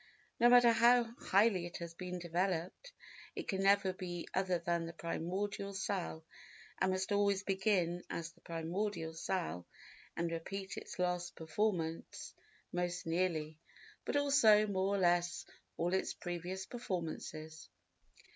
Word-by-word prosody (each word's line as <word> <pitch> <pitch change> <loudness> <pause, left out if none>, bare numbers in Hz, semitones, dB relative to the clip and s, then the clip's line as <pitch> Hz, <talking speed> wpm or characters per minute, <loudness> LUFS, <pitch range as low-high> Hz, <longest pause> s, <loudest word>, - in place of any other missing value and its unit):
No 240 0 +7
matter 245 -1 +8
how 235 +2 +6 0.2
highly 195 -3 +3
it 175 - -7
has 170 -1 -7
been 180 +1 -5
developed, 180 - -2 0.4
it - - -5
can 195 -1 -1
never 195 -1 +4
be 175 -2 -5
other 185 -1 +1
than 170 0 -1
the 165 - -7
primordial 195 +5 -3
cell 185 -5 -3 0.5
and 190 - +2
must 185 +2 -1
always 200 -1 +2
begin 190 -3 +1
as 165 0 -4
the - - -26
primordial 170 +1 -3
cell 90 - -3 0.5
and 170 0 0
repeat 190 +4 -4
its - - -8
last 180 -1 -1
performance 165 0 -2 0.4
most 175 0 -2
nearly, 165 -2 -1 0.4
but - - -2
also, 275 -7 +6
more 195 -1 0
or - - +1
less, 175 -2 +2 0.3
all 175 +2 0
its 190 - 0
previous 180 +2 -4
performances. 160 -7 -5
180 Hz, 135 wpm, -35 LUFS, 170-200 Hz, 0.5 s, matter